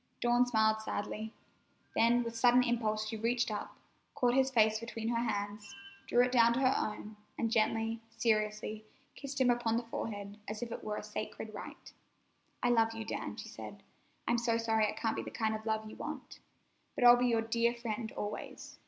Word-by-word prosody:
Dawn 240 +1 +3
smiled 220 -2 +3
sadly. 220 +1 -4 0.6
Then 240 +1 +4
with 230 -1 -5
sudden 245 +2 +5
impulse 220 -3 0
she 220 0 -4
reached 230 +1 0
up, 210 - -5 0.4
caught 245 -1 +2
his 265 0 +3
face 220 -3 +4
between 230 -1 -4
her 235 0 0
hands, 205 +1 -5 0.3
drew 245 - +5
it 250 - 0
down 235 -2 +5
to 240 - 0
her 265 0 +4
own, 210 0 -3 0.2
and 230 -1 0
gently, 225 0 +1 0.2
seriously, 215 -1 0 0.3
kissed 280 -1 -6
him 250 -2 +5
upon 235 -1 +1
the 240 - -1
forehead 205 -3 -5
as 215 +2 -4
if 235 - -6
it - - -6
were 210 -1 -3
a - - -5
sacred 215 +1 -6
rite. 205 - -9 0.7
"I 245 - +3
love 225 -1 +3
you, 225 -1 -5
Dan," - - -4
she - - -7
said. - - -9 0.4
"I'm 235 0 +3
so 230 -1 +1
sorry 225 -1 +2
it 210 - -3
can't 225 - 0
be - - -1
the - - -6
kind 220 -1 -1
of 220 +1 -5
love 220 0 -1
you 215 - -9
want. - - -7 0.6
But - - -1
I'll 240 0 +10
be 250 +1 +2
your 230 -2 +2
dear 235 +1 +1
friend 230 -1 -4
always. 210 0 -6
225 Hz, 195 wpm, -33 LUFS, 215-240 Hz, 0.7 s, I'll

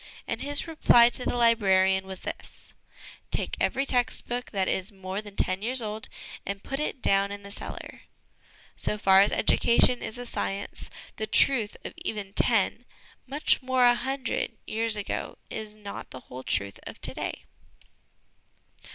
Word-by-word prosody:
And - - -3
his 285 0 +1
reply 240 -7 +6
to 250 - -4
the - - 0
librarian 190 -5 +3
was 190 -1 -7
this: - - -9 0.3
' - - -18
Take - - 0
every 270 - +1
text 245 -3 +1
book 245 +1 -3
that 195 -3 -1
is 190 +3 -1
more 190 0 -5
than 205 -2 -12
ten 185 0 0
years 250 +4 +1
old, 215 -1 -3 0.3
and 200 0 -5
put 270 - -4
it 295 -3 -3
down 195 0 +2
in 205 0 -7
the 200 - -9
cellar.' - - -4 0.4
" - - -28
So 210 - 0
far 195 -2 +6
as 200 - +3
education 240 +1 +4
is 225 - -6
a 245 - -6
science, 200 -4 -4 0.3
the 215 - -3
truth 225 -1 +4
of - - -5
even 200 -2 -4
ten 230 +2 +2 0.4
much 285 +2 +2
more, 260 -1 +2
a 245 - +7
hundred 260 -2 -2
years 225 0 0
ago 205 -1 -4
is 215 -1 -5
not 205 -1 -8
the 130 - -10
whole 125 +1 -9
truth 100 -6 -2
of - - -9
to - - -1
day. - - -5
215 Hz, 170 wpm, -27 LUFS, 195-245 Hz, 0.4 s, a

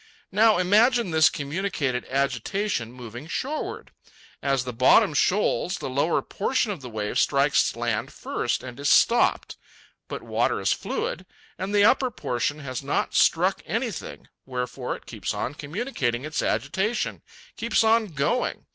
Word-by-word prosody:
Now 215 +2 +5
imagine 215 +3 +3
this 160 0 +5
communicated 145 -5 -2
agitation 135 - -1
moving 120 +2 -9
shoreward. 280 - -4 0.5
As 135 -2 +1
the 125 -1 -5
bottom 130 +5 +5
shoals, 185 +2 +1
the - - -5
lower 145 +6 +1
portion 225 +1 -1
of 185 -8 -6
the 125 - -8
wave 105 -2 -2
strikes 140 -2 +2
land 120 +1 -2
first 120 - -2
and 125 0 -9
is 140 0 0
stopped. 240 - +3 0.5
But - - -6
water - - 0
is - - +2
fluid, - - -4 0.3
and 190 +2 -4
the 205 0 +4
upper 260 +3 +4
portion 145 - -2
has 130 -3 -5
not - - -1
struck - - +3
anything, - - -4 0.2
wherefore 125 -1 -4
it - - -14
keeps - - -4
on 130 - -3
communicating 145 - -3
its 155 0 -2
agitation, 190 - -1 0.3
keeps 230 0 +1
on 225 0 +3
going. 155 - -1
150 Hz, 145 wpm, -25 LUFS, 125-210 Hz, 0.5 s, Now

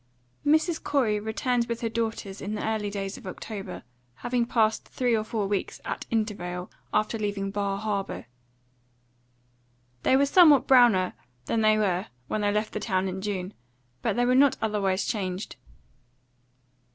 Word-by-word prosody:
XII. 290 - +4 0.2
MRS. - - -8
COREY 235 -8 +1
returned 235 +3 0
with 235 -1 -3
her 230 - 0
daughters 225 -3 -3
in 205 +2 -3
the 210 - -3
early 215 -2 -1
days 195 -1 -4
of - - -11
October, 200 +2 -7 0.3
having 240 - -1
passed 220 -2 +2
three 245 -2 +1
or 215 - 0
four 215 -1 -2
weeks 195 -1 -2
at - - -4
Intervale 185 -5 -2 0.2
after 215 +1 0
leaving 200 -2 -2
Bar 200 -1 -1
Harbour. 200 -2 -3 1.8
They 260 - +4
were 280 - +4
somewhat 290 -4 +6
browner 240 -8 +5 0.3
than 225 - 0
they 215 0 +4
were 190 -3 0 0.2
when 215 - -1
they 205 0 +2
left 210 +1 -1
town 190 -3 0
in 190 0 -4
June, 195 -1 -3 0.5
but - - 0
they 245 0 +2
were 250 - +3
not 275 +1 +5
otherwise 200 -3 0
changed. 190 -2 -3
215 Hz, 155 wpm, -27 LUFS, 195-235 Hz, 1.8 s, somewhat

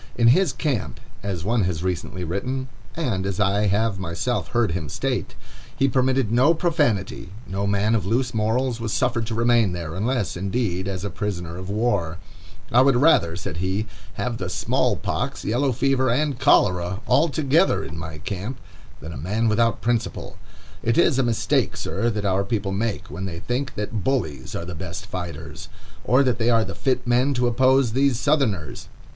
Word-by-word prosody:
"In 115 -1 +5
his 170 +5 +4
camp," 120 - -2 0.2
as 95 -5 -3
one 110 0 +1
has 90 -2 -2
recently 90 0 -3
written, 125 +10 -3 0.3
and 120 - -1
as 95 0 -3
I 100 +1 +2
have 100 0 +1
myself 90 +7 -2
heard 120 -6 +1
him 80 -4 -3
state, - - -2 0.4
"he 135 - +3
permitted 130 -3 +1
no 130 +8 +4
profanity; 145 - 0 0.2
no 100 +2 -2
man 100 +2 +2
of 110 -5 +1
loose 120 +6 0
morals 115 +2 0
was 115 -2 -2
suffered 120 -2 0
to 115 - -3
remain 115 -4 +3
there, 85 -3 -5
unless, 110 +3 -1
indeed, 95 0 -1
as 95 0 -3
a 100 - -3
prisoner 85 -4 -4
of 95 +1 -7
war. 100 -6 0 0.5
'I 125 - +6
would 135 -1 +4
rather,' 120 - +4
said 85 -3 -5
he, 95 +4 -1 0.3
'have 120 -2 -3
the 90 - -3
small - - +1
pox, - - -3
yellow 130 +5 +1
fever, 130 +1 +1
and 140 +1 0
cholera, 95 -7 +3
all 160 +4 +3
together 155 +5 +2
in - - -7
my 80 -1 -6
camp, 100 - -5 0.4
than 80 +3 -7
a - - -7
man 105 - 0
without 115 +1 +2
principle.... 120 -1 -2 0.5
It 115 0 +1
is 150 -5 +4
a - - +5
mistake, 120 -3 +1
sir, 115 +5 -1
that 105 -2 -2
our 95 0 +2
people 100 -3 -2
make, 105 -3 -2
when 90 +6 -5
they 85 -3 -5
think 125 +8 -3
that 105 -1 -3
bullies 80 - -2
are 85 - -4
the 90 - -6
best 85 +1 -6
fighters, 90 -3 -7 0.3
or 130 +3 +4
that 125 -2 +1
they 115 +1 +2
are 115 -2 +4
the - - -6
fit 130 -2 -1
men 125 +3 +2
to 125 0 +1
oppose 130 +1 +3
these 135 0 +2
Southerners. 130 - 0
110 Hz, 185 wpm, -23 LUFS, 95-125 Hz, 0.5 s, I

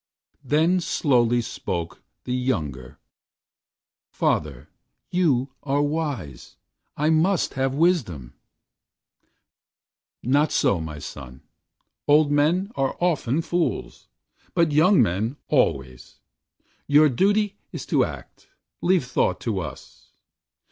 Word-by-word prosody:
The 160 +7 +2
slowly 120 -7 +2
spoke 85 -6 -5 0.2
The 125 - -3
younger: 75 - -3 1.1
"Father, 75 -5 -1 0.4
you 140 -8 +1
are 145 +1 0
wise. 145 - -4 0.4
I 150 +2 +2
must 170 +4 +2
have 135 0 -1
Wisdom." 130 - 0 1.9
"Not 145 +4 +2
so, 95 - +2
my 80 -1 -6
son. 65 -3 -10 0.6
Old 145 0 +4
men 165 +8 +2
are 135 - -1
often 165 -4 0
fools, 175 +1 -2 0.5
but 170 -2 +3
young 160 +1 +5
men 110 +8 -2
always. 65 -2 -1 0.7
Your 150 +2 +6
duty 205 - +1
is - - -6
to - - +2
act; - - -8 0.3
leave 180 -6 +2
thought 125 - 0
to 110 -5 -2
us." 90 - -9
140 Hz, 100 wpm, -24 LUFS, 100-160 Hz, 1.9 s, Your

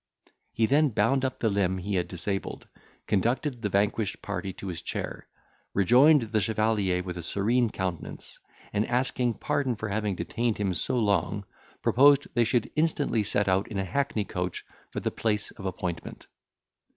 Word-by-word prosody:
He 115 - +2
then 145 +5 +4
bound 125 +4 +2
up 130 -1 -1
the 115 - +1
limb 95 -2 +1
he 100 +3 -4
had 90 -2 0
disabled, 95 +3 -4 0.4
conducted 120 +5 0
the 105 - -1
vanquished 100 +1 0
party 100 -1 -3
to - - -10
his 85 -4 -4
chair, - - -5 0.5
rejoined 125 - +5
the 110 -1 +2
chevalier 105 -3 +1
with 90 -1 -5
a - - -4
serene 110 +7 +1
countenance, 90 -6 -5 0.3
and, 105 +1 +1
asking 125 -1 +1
pardon 130 +3 -1
for 110 0 -4
having 105 -1 -1
detained 115 +6 -1
him 100 -3 0
so 90 - -1
long, 100 -2 +1 0.4
proposed 140 +2 +5
they 120 - +3
should 120 0 0
instantly 150 -7 +1
set 105 0 0
out 95 +1 +2
in 105 - -5
a 95 - -1
hackney 110 0 -1
coach 90 -2 -4 0.2
for - - -4
the - - -1
place 105 -2 -1
of 95 - -7
appointment. 90 -2 -5
105 Hz, 165 wpm, -27 LUFS, 95-120 Hz, 0.5 s, rejoined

